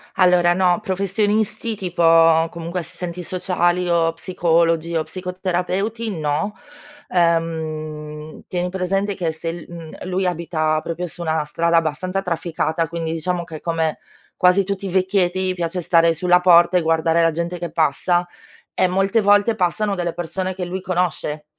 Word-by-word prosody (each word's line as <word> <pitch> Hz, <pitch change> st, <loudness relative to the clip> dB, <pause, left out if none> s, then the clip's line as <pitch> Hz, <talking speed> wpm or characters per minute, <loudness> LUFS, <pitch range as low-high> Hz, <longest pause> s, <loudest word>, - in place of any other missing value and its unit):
Allora 180 Hz, -1 st, +4 dB
no, 180 Hz, -1 st, +2 dB
professionisti 210 Hz, +3 st, 0 dB
tipo 165 Hz, -3 st, +4 dB
comunque 170 Hz, +2 st, -5 dB
assistenti 180 Hz, +1 st, -6 dB
sociali, 180 Hz, 0 st, 0 dB
o 165 Hz, -1 st, +2 dB
psicologi, 165 Hz, -1 st, +1 dB
o 160 Hz, -, +1 dB
psicoterapeuti 185 Hz, +4 st, -3 dB
no. 155 Hz, +7 st, -1 dB, 0.5 s
Ehm, 155 Hz, -3 st, -2 dB
tieni 180 Hz, 0 st, -2 dB
presente 195 Hz, +2 st, -1 dB
che 170 Hz, -4 st, -1 dB
se 160 Hz, +1 st, -4 dB
l 170 Hz, -2 st, -9 dB
umh, 165 Hz, -2 st, -9 dB
lui 185 Hz, +1 st, -1 dB
abita 155 Hz, -3 st, 0 dB
proprio 175 Hz, +2 st, -4 dB
su 175 Hz, -, -10 dB
una 160 Hz, -2 st, 0 dB
strada 170 Hz, +3 st, +1 dB
abbastanza 165 Hz, +4 st, -1 dB
trafficata. 165 Hz, -2 st, -2 dB
Quindi 165 Hz, -1 st, -4 dB
diciamo 170 Hz, +2 st, -2 dB
che 160 Hz, -2 st, -9 dB
come 165 Hz, -2 st, -1 dB, 0.4 s
quasi 180 Hz, +2 st, +4 dB
tutti 200 Hz, +1 st, -4 dB
i -, -, -4 dB
vecchietti 185 Hz, 0 st, +1 dB
piace 175 Hz, 0 st, -3 dB
stare 165 Hz, -1 st, +4 dB
sulla 180 Hz, +2 st, +3 dB
porta 175 Hz, 0 st, +6 dB
e 180 Hz, -, +2 dB
guardare 165 Hz, +1 st, +2 dB
la 165 Hz, 0 st, +3 dB
gente 170 Hz, +2 st, -3 dB
che 170 Hz, -2 st, -5 dB
passa, 170 Hz, +3 st, +1 dB, 0.5 s
e 185 Hz, -, +2 dB
molte 195 Hz, +5 st, +1 dB
volte 205 Hz, +2 st, +4 dB
passano 200 Hz, +3 st, 0 dB
delle 175 Hz, -2 st, -2 dB
persone 185 Hz, +2 st, -3 dB
che 180 Hz, -1 st, -4 dB
lui 185 Hz, +1 st, -4 dB
conosce 175 Hz, -5 st, -2 dB
175 Hz, 150 wpm, -21 LUFS, 165-185 Hz, 0.5 s, porta